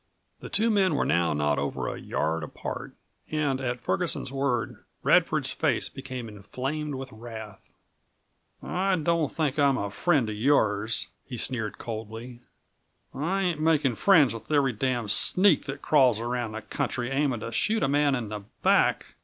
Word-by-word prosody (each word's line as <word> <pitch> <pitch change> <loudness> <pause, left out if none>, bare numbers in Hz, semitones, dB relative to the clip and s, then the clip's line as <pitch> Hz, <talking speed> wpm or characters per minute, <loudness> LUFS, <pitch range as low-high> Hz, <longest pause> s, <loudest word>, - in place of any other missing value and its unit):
The - - -8
two 225 +2 +2
men 190 -6 +3
were - - +1
now 85 +1 +2
not 75 -1 +1
over 70 - -2
a - - -5
yard 80 +2 -1
apart, 75 - -6 0.3
and 145 -4 0
at 125 -1 -2
Ferguson's 170 -4 -1
word 135 -3 -1 0.2
Radford's - - +3
face - - 0
became 130 -3 -7
inflamed 135 +8 -4
with 130 0 -7
wrath. 110 -2 -9 1.0
"I 190 +1 +1
don't 165 -2 +1
think 150 -3 -1
I'm 140 -2 +4
a 100 -3 -3
friend 145 - +2
of 105 - -3
yours," 110 -3 +2
he 125 - -7
sneered 115 -4 -3
coldly; 115 +2 -7 0.7
"I 185 +7 -1
ain't 175 -4 0
making 155 -5 +3
friends 150 - +5
with 115 - -9
every 140 -4 +3
damned 120 -2 -1
sneak 185 - +4
that 140 0 -6
crawls 130 -7 +4
around 120 -1 -2
the 110 -1 -6
country, 120 +3 -3
aiming 135 -4 0
to 115 - -5
shoot 215 - +1
a - - +3
man 145 0 +3
in 115 -5 -4
the 105 0 -4 0.2
back." - - +3
130 Hz, 160 wpm, -27 LUFS, 110-150 Hz, 1.0 s, friends